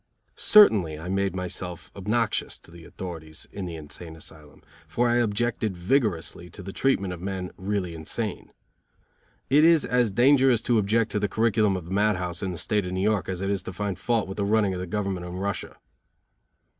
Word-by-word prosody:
Certainly 100 - +5
I 80 +4 -7
made 95 -1 0
myself 90 -1 -5
obnoxious 110 +3 -1
to - - -19
the 85 -1 -13
authorities 80 -4 -8
in 95 -2 -5
the 85 - -6
insane 80 +1 -10
asylum, 75 -2 -12 0.2
for 120 +1 +1
I 120 0 +3
objected 115 -3 0
vigorously 90 - 0
to - - -10
the 95 +1 -7
treatment 100 -9 +1
of 85 - -9
men 95 -1 -4
really 95 -2 -2
insane. 90 +6 -4 1.0
It 150 +3 +6
is 165 -2 +5
as 125 -2 +2
dangerous 130 +2 +4
to 120 -2 +3
object 110 +2 +1
to 105 - 0
the 105 -1 -1
curriculum 110 -2 +2
of 90 - -7
a 85 - -10
mad 105 +1 +3
house 90 -1 -4
in 95 -2 -2
the 90 - -6
State 105 +2 0
of 90 - -4
New 95 - -1
York 105 -4 +1
as 90 -1 -3
it 95 +1 -1
is 100 -2 -1
to - - -7
find 100 -1 -3
fault 115 -1 0
with 95 - -7
the 100 - 0
running 105 -1 +2
of 90 - -4
the 90 - -4
government 95 -2 -3
in 90 - -7
Russia. 100 0 -4
95 Hz, 200 wpm, -26 LUFS, 90-110 Hz, 1.0 s, It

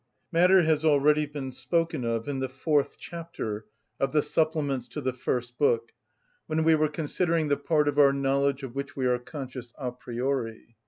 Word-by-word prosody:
Matter 180 +2 +5
has 155 -1 +2
already 150 0 +4
been 140 -2 -5
spoken 150 +3 -1
of 115 +1 -1
in 140 -2 -2
the 130 -1 -2
fourth 145 +2 0
chapter 160 -11 -6 0.3
of 135 +1 0
the 150 -1 +3
supplements 150 -5 0
to 150 - -6
the 130 -3 -1
first 125 -1 -3
book, 115 -5 +2 0.6
when 160 +1 0
we 160 0 +5
were 155 -1 +3
considering 160 +1 0
the 145 - +2
part 150 -3 +1
of 145 0 +1
our 140 -1 +7
knowledge 140 0 +1
of 130 -3 -6
which 140 +1 -5
we 130 - -1
are 125 -1 +2
conscious 130 -3 -8
a 125 -3 -3
priori. 120 -2 -4
140 Hz, 180 wpm, -27 LUFS, 125-155 Hz, 0.6 s, our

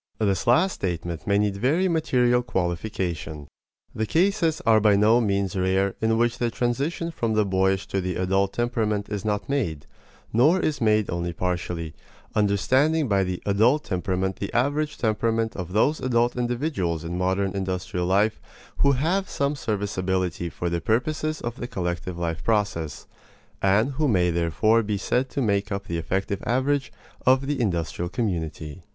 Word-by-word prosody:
This 100 -4 0
last 180 +11 +4
statement 85 -3 -4
may 100 0 +3
need 100 -1 +1
very 155 - +2
material 125 -7 +2
qualification. 85 - -3 0.5
The 110 0 -2
cases 170 - +2
are 110 -1 +6
by 105 -1 +4
no 110 +4 +4
means 100 -3 0
rare 95 +1 +1
in 110 0 +2
which 120 0 +1
the 120 - +1
transition 135 +9 -1
from 115 -8 -1
the 105 -1 +3
boyish 95 0 +1
to 95 - -1
the 90 -1 -3
adult 95 +1 +1
temperament 110 -4 -1
is 105 -2 -3
not 105 -2 -1
made, 95 - -2 0.5
or 150 +11 +4
is 155 -6 -1
made 110 -2 +2
only 85 0 -2
partially 90 -2 -3 0.4
understanding 130 - +2
by 100 -3 +2
the 90 -1 -4
"adult" 115 +9 +3
temperament 95 0 -2
the 100 - -4
average 145 +5 0
temperament 115 0 0
of 90 -2 -5
those 130 +10 +2
adult 120 -1 +1
individuals 120 - -1
in 85 +1 -4
modern 95 +1 0
industrial 90 -2 -2
life 100 +4 +2 0.4
who 140 0 +4
have 175 +9 0
some 140 +1 -1
serviceability 95 - -2
for 90 - -4
the 85 0 -1
purposes 155 +7 -1
of 120 +1 -4
the 120 - -5
collective 90 -3 -3
life 85 -2 -3
process, 100 -9 -1 0.6
and 100 +7 +3
who 150 +3 0
may 90 -7 +2
therefore 85 +7 +2
be 105 -1 -2
said 125 +6 0
to 140 - -2
make 100 -2 0
up 100 0 -3
the 85 -4 -3
effective 95 +4 -2
average 135 +4 +1 0.3
of 130 +1 +4
the 140 -2 -1
industrial 85 -4 -1
community. 85 - -3
105 Hz, 160 wpm, -25 LUFS, 90-125 Hz, 0.6 s, are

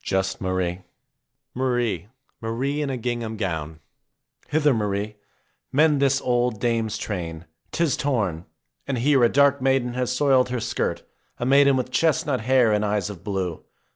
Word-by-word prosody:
Just 95 0 -1
Marie! 95 -1 -1 0.7
Marie! 120 -8 -1 0.3
Marie 130 +6 -2
in 145 - -2
a 130 - -2
gingham 120 -2 -3
gown! 80 -6 -4 0.7
Hither, 150 -2 +3
Marie; 105 -1 -2 0.5
mend 150 0 +3
this 135 -1 +3
old 120 -4 0
dame's 115 -2 0
train, 85 -6 -5 0.3
'tis 170 -5 +1
torn. 110 - -1 0.4
And 135 -2 -1
here 135 +1 +3
a 120 - +6
dark 140 0 +3
maiden 130 -2 +1
has 125 0 -1
soiled 130 -1 +3
her 125 0 -2
skirt, 115 0 -2 0.3
a 120 - -3
maiden 140 +1 +5
with 125 0 -3
chestnut 145 -2 +1
hair 125 -1 +3
and 105 0 +1
eyes 105 -1 -1
of 90 -5 -11
blue. 95 -5 -3
120 Hz, 150 wpm, -24 LUFS, 100-135 Hz, 0.7 s, a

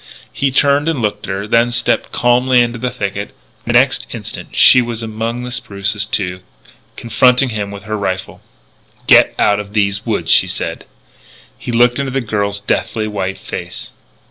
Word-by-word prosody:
He 140 - 0
turned 145 +3 +2
and 160 -5 -1
looked 105 -2 -2
at - - -3
her, 100 +2 -4
then 115 +2 +3
stepped 120 - 0
calmly 125 +1 +3
into 120 0 -1
the 125 - -1
thicket. 100 -4 -5 0.3
And - - 0
the - - +9
next - - 0
instant - - -7
she 125 - +7
was 115 -1 -4
among 115 +2 -4
the 125 - -6
spruces, 100 -2 -2
too, 90 -4 -1 0.6
confronting 125 +3 +3
him 105 -3 -4
with 100 -1 -9
her 110 +1 -4
rifle. 95 -2 -4 0.6
"Get - - +5
out 100 0 +2
of 105 0 -8
these 100 -1 0
woods!" 100 -8 -1
she - - +5
said. - - -4 0.7
He - - -6
looked 120 +2 +3
into 140 -1 -2
the 135 +1 -1
girl's 100 -4 -2
deathly 110 +2 -2
white 95 -2 -3
face. - - -7
110 Hz, 175 wpm, -16 LUFS, 100-125 Hz, 0.7 s, the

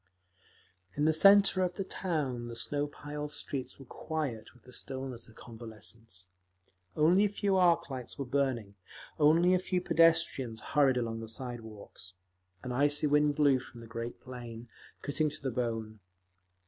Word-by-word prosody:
In 145 - +1
the 160 - +4
centre 195 +2 +6
of 180 -1 0
the 195 - -2
town 150 -11 -3
the 120 - -7
snow 145 +5 0
piled 150 0 -7
streets 135 -3 -5
were 135 - -12
quiet 145 -5 -4
with 125 -3 -23
the 125 - -15
stillness 130 -3 -3
of 110 - -18
convalescence. 110 -3 -10 0.7
Only 175 +6 +4
a - - +1
few 200 -1 0
arc 180 -2 +4
lights 130 -2 -6
were 140 - -3
burning, 125 -6 -1 0.5
only 165 +4 +5
a 185 - +4
few 185 0 -1
pedestrians 165 -9 +3
hurried 135 +2 +2
along 115 -2 -2
the 115 -1 -6
side 120 +1 -3
walks. 105 -4 -11 0.5
An 125 - -4
icy 145 +4 +3
wind 150 0 +3
blew 140 -3 +4
from 120 -1 -12
the 115 - -10
great 115 +1 -6
plain, 120 -2 -9 0.3
cutting 155 +2 0
to 150 - -5
the 135 - -1
bone. 115 -3 -3
135 Hz, 160 wpm, -31 LUFS, 115-155 Hz, 0.7 s, centre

